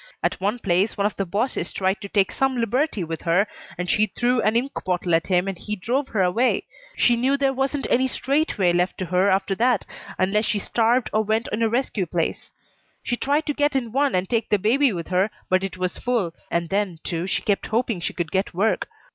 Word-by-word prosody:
At - - -1
one 205 +5 0
place 195 -1 +1
one 200 - +1
of 210 - 0
the 195 - -2
bosses 200 -1 -1
tried 190 +1 -1
to 200 - -7
take 195 -2 +2
some 270 -1 0
liberty 240 - 0
with 165 -1 -5
her 180 +4 +3 0.3
and 180 0 -3
she 215 +4 +3
threw 245 +4 +1
an 215 +1 +1
ink 255 +4 +1
bottle 180 -1 -1
at 165 0 +2
him 180 0 +2
and 195 - -2
he 210 +4 -4
drove 250 +8 -1
her 200 -4 +1
away. 225 +8 +2 0.3
She 240 - +4
knew 260 +4 +2
there 275 -1 +1
wasn't 270 +1 -1
any 260 +2 +2
straight 280 +4 0
way 180 -3 +3
left 180 +1 0
to 185 - -3
her 180 +3 +2
after 195 +1 +1
that 235 +1 +2 0.3
unless 210 +4 +1
she 215 - 0
starved 230 +4 +1
or 215 - +3
went 220 +2 0
in 215 - -2
a 225 - +3
rescue 230 -6 -1
place. 165 0 -2 0.5
She 240 - -1
tried 285 +5 0
to 295 - -1
get 290 0 +1
in 240 -4 -1
one 275 0 +1
and 185 +1 0
take 225 0 -1
the 210 - +4
baby 245 +7 +3
with 170 -4 -5
her, 185 +3 +2 0.2
but 185 0 +2
it 195 -1 -4
was 185 -1 -2
full, 230 -9 0 0.2
and 170 -1 -1
then, 195 -3 -1
too, 170 +1 -3
she - - -1
kept 205 -2 0
hoping 225 -3 0
she 170 - -3
could 170 -2 -3
get 190 -2 -1
work. 210 +5 +1
210 Hz, 230 wpm, -23 LUFS, 185-245 Hz, 0.5 s, She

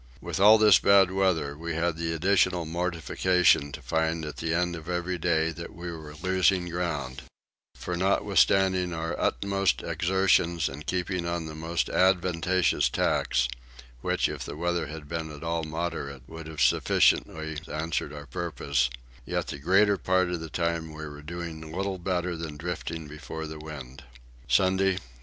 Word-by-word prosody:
With - - -4
all 105 +3 +8
this 105 -3 +7
bad 95 -2 +5
weather 95 -7 +1
we 85 +1 -5
had 85 0 0
the 80 0 -2
additional 90 +1 +2
mortification 85 -1 +2
to - - -8
find 80 0 0
at 75 - -7
the 80 0 -2
end 85 +1 +1
of 80 +1 -9
every 90 0 -2
day 80 -1 +1
that 85 +1 -9
we 85 0 -6
were 80 -2 -9
losing 95 -1 +2
ground; 80 -7 -3 0.5
for 90 - -4
notwithstanding 95 -1 +2
our 80 +1 -3
utmost 100 -1 +1
exertions 85 -2 +2
and 70 +3 -8
keeping 90 -1 -1
on 85 -1 -2
the 80 - -7
most 80 +2 -2
advantageous 90 -1 +2
tacks - - +1 0.5
(which - - +1
if - - -5
the 70 - -7
weather 85 -1 -1
had 75 -1 -8
been 80 0 -4
at 75 +1 -9
all 85 0 -1
moderate 80 -5 -4
would 80 +2 -9
have 80 -1 -5
sufficiently 80 -1 +2
answered 75 -2 -2
our 75 -1 -8
purpose) 70 -3 -1 0.3
yet - - -3
the - - -5
greater 100 +6 +4
part 95 -1 +1
of 90 - -2
the 80 0 -7
time 85 -1 -2
we 80 0 -6
were 75 0 -9
doing 80 0 -7
little 95 +2 -3
better 90 -1 -1
than 80 -2 -6
drifting 80 -1 -5
before 80 +1 -7
the 80 0 -7
wind. 70 -4 -9 0.4
Sunday 95 +8 +3
13. 95 - -4
85 Hz, 165 wpm, -27 LUFS, 80-90 Hz, 0.5 s, all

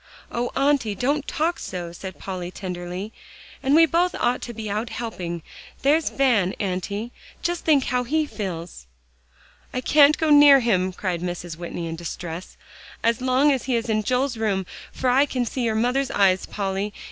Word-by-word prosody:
"Oh, 240 +1 -1
Auntie! 270 -6 +2
don't 285 +5 0
talk 330 +3 -1
so," 175 -2 -5
said 185 +2 -8
Polly 185 -2 -5
tenderly; 180 +2 -6 0.5
"and 275 +2 +3
we 330 +1 +8
both 345 +3 +1
ought 245 +1 +1
to 240 - -5
be 220 -2 -6
out 215 +3 -2
helping. 180 -9 -5 0.4
There's 300 +3 +3
Van, 230 -9 +2
Auntie; 200 +4 -3 0.3
just 345 0 -2
think 290 -4 +4
how 250 -1 0
he 305 +5 +1
feels." 175 - -6 0.8
"I 255 - -2
can't 290 +3 +5
go 315 -1 +1
near 290 -1 +9
him," 190 -6 +1
cried 180 -2 -3
Mrs. 175 -1 -4
Whitney 170 0 -5
in 165 0 -4
distress, 170 +1 -7 0.5
"as 230 +1 +2
long 260 +3 +3
as 265 -3 -1
he 260 -2 0
is 230 0 -2
in 215 -1 +2
Joel's 250 +3 0
room, 200 -4 0 0.3
for 260 - -3
I 265 +3 +4
can 250 -3 -1
see 255 - -3
your 225 -2 0
mother's 250 +4 +1
eyes, 190 -2 +2
Polly. 200 0 -3
230 Hz, 175 wpm, -23 LUFS, 185-270 Hz, 0.8 s, near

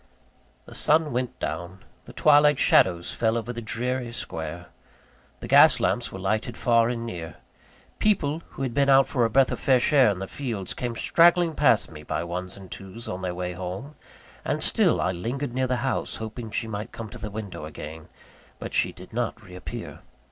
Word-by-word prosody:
The - - -12
sun 155 0 +3
went 125 0 -3
down; 85 +4 -5 0.2
the - - -11
twilight 150 -1 +5
shadows 85 -7 +3
fell 115 0 +1
over 115 +1 -4
the 120 - -6
dreary 120 +2 -3
square; 85 -5 -6 0.7
the - - -6
gas - - +7
lamps - - 0
were - - -7
lighted 110 +5 -2
far 115 -2 +3
and 115 -1 -3
near; 85 -8 -6 0.6
people 165 -7 +1
who 135 - -6
had 125 -3 -2
been 140 +2 +2
out 135 0 +6
for 125 -4 +1
a - - +1
breath 130 +3 +3
of - - -3
fresh 130 +2 +2
air 135 -5 +6
in 100 - -1
the 95 - -4
fields, 110 -5 -4
came 120 -2 -4
straggling 170 +4 +4
past 145 - +3
me 75 -1 -10
by 75 +2 -3
ones 90 +2 -5
and 95 -2 -12
twos, 95 +4 -8
on 90 - -5
their 90 -1 -3
way 90 0 -3
home 95 - -6 0.5
and - - -1
still - - +3
I 90 - +1
lingered 120 +9 -4
near 130 0 0
the 125 0 0
house, 135 - -1
hoping 110 +1 -6
she 115 +2 -2
might 105 -1 -5
come 115 -2 -7
to - - -9
the 105 - -5
window 100 -6 -6
again; 80 +1 -9 0.5
but - - -7
she - - +2
did 90 +5 -14
not 120 0 -2
re 90 -3 -13
appear. 90 - -7
115 Hz, 200 wpm, -25 LUFS, 90-130 Hz, 0.7 s, gas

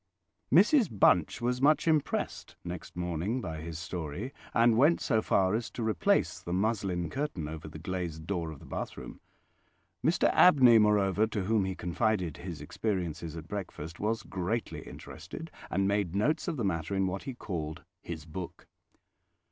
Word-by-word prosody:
Mrs 205 - +5
Bunch 95 -1 +3
was 125 +1 0
much 150 +4 +4
impressed 155 -3 0
next 90 -1 -7
morning 90 +7 -2
by 80 -8 -5
his 80 0 -6
story, 90 - -5 0.2
and 115 0 +4
went 145 +8 +5
so 110 -4 +1
far 95 -2 +2
as 110 -1 -1
to 115 - -5
replace 110 -2 +1
the 85 - -7
muslin 95 -3 0
curtain 135 - -3
over 80 0 -7
the 80 - -9
glazed 85 -2 -4
door 85 -3 -2
of 80 - -8
the - - -14
bathroom. - - -6 0.8
Mr 165 +5 +3
Abney, 130 -10 +7
moreover, 105 0 +3
to 105 -3 -2
whom 105 0 +2
he 95 -1 -3
confided 90 -1 -1
his 85 -5 -7
experiences 85 -2 -3
at 80 -1 -8
breakfast, 85 -4 -6
was 110 +1 -1
greatly 95 +5 -3
interested, 160 0 -9 0.2
and 95 +2 +1
made 100 -3 0
notes 150 - +1
of 165 -4 -2
the 115 - -1
matter 85 0 -1
in 95 0 +2
what 95 +1 -2
he 135 -3 -5
called 80 - -5 0.2
"his 80 -3 -7
book". 85 +2 -7
95 Hz, 165 wpm, -30 LUFS, 85-115 Hz, 0.8 s, Abney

